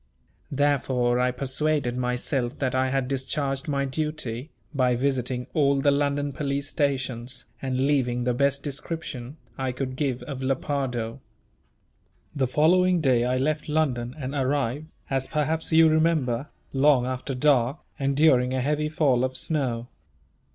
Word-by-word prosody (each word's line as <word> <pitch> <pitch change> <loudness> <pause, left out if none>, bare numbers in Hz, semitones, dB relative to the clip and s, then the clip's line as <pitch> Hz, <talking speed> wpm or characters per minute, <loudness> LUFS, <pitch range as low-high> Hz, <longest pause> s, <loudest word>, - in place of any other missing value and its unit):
Therefore 130 -4 +1
I 125 0 +3
persuaded 135 0 0
myself 125 +1 -1
that 130 -2 -1
I 130 0 +1
had 135 -1 0
discharged 135 +1 -2
my 140 -2 0
duty, 145 -2 -3 0.2
by 125 -3 +2
visiting 125 -1 -1
all 140 -3 +3
the 145 +1 +4
London 145 0 0
police 140 0 -2
stations, 130 -4 -2 0.2
and 130 0 0
leaving 125 -4 +1
the 125 0 +1
best 140 +2 +1
description 145 -2 -5 0.2
I 130 -1 -1
could 130 0 -4
give 130 -3 -1
of 135 0 -6
Lepardo. 130 -3 -2 1.2
The 135 -2 +1
following 180 +6 +4
day 130 -6 +3
I 125 +1 +1
left 150 +3 -1
London, 130 -6 0
and 135 -2 -5
arrived, 140 +1 -1 0.2
as 135 0 0
perhaps 155 +2 0
you 160 0 +7
remember, 155 -5 +1 0.3
long 135 -2 +4
after 130 +1 -3
dark, 130 0 +3 0.2
and 140 0 0
during 130 -4 +4
a - - 0
heavy 150 +3 0
fall 140 -5 +2
of 130 0 -2
snow. 125 -7 -1
135 Hz, 145 wpm, -25 LUFS, 125-145 Hz, 1.2 s, you